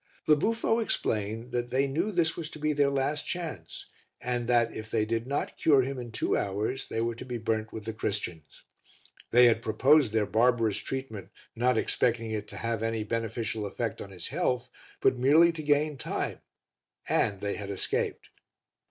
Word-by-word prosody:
The 150 - +6
buffo 225 +7 +1
explained 115 - -1
that 120 0 -2
they 135 +2 +2
knew 165 +10 -1
this 170 -4 +1
was 160 -3 -5
to - - -10
be 155 0 0
their 145 -1 +3
last 140 +2 -1
chance, 170 -4 -5 0.3
and 120 -1 -2
that 120 -2 +3
if 110 0 -7
they 110 -1 +1
did 115 +2 -2
not 140 +1 -2
cure 140 -4 +5
him 135 0 -4
in 120 -2 -7
two - - 0
hours 105 +7 -2
they 115 - -2
were 115 0 0
to 115 - -8
be 125 -1 -4
burnt 110 -1 -2
with 110 -2 -7
the 110 - -3
Christians. 90 -8 -4 0.7
They 125 +1 +7
had 115 -1 +4
proposed 130 +4 +4
their 110 -1 +2
barbarous 115 -1 +2
treatment 130 -7 -5 0.3
not 125 +1 +2
expecting 115 0 +1
it 105 -1 -3
to 100 - -10
have 115 0 -2
any 115 -1 -1
beneficial 115 0 -2
effect 115 +2 -3
on 100 - -7
his 90 -3 -7
health 125 0 -1 0.3
but 130 -2 +3
merely 155 +7 +6
to 165 -1 -6
gain 145 -1 +1
time, - - -3 0.7
and 100 -2 +1
they 100 0 -2
had 100 -1 -6
escaped. 100 - -2
120 Hz, 185 wpm, -29 LUFS, 110-140 Hz, 0.7 s, They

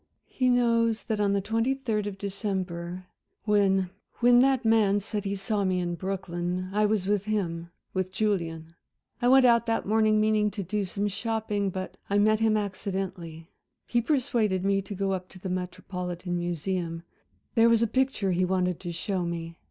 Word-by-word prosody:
"He 255 -1 0
knows 230 -2 +2
that 220 -2 -2
on 200 -1 +2
the 200 - +1
twenty 225 +6 0
third 220 -6 -2
of 200 -2 -5
December, 185 -3 -4 0.4
when 195 -3 +2 0.3
when 245 0 +6
that 265 -1 +3
man 215 -3 +4
said 205 0 -4
he 200 0 -1
saw 200 +1 -1
me 185 -1 +1
in 175 -1 -2
Brooklyn, 180 0 -3
I 210 +1 +3
was 205 -3 0
with 205 0 0
him 170 -6 -2 0.2
with 185 -1 -1
Julian. 165 -6 -2 0.5
I 240 - +2
went 260 +1 +7
out 235 -1 +4
that 225 - 0
morning, 215 0 +3
meaning 215 -1 +3
to 205 -1 -5
do 200 +3 -2
some 200 +3 -2
shopping, 210 -1 -1
but 185 0 -6
I 200 - +2
met 215 +1 +4
him 220 -1 +3
accidentally. 185 -4 -4 0.3
He 240 - +1
persuaded 225 - +1
me 195 0 +2
to 200 +1 -7
go 195 0 -1
up 185 -1 -3
to 185 - -14
the 190 - -5
Metropolitan 180 -1 -4
Museum 175 0 -2 0.5
there 230 0 +5
was 230 0 +4
a - - +4
picture 255 -5 0
he 180 +1 +1
wanted 180 -1 0
to 175 - -5
show 180 +2 -2
me. 170 -1 -4
200 Hz, 180 wpm, -27 LUFS, 180-220 Hz, 0.5 s, went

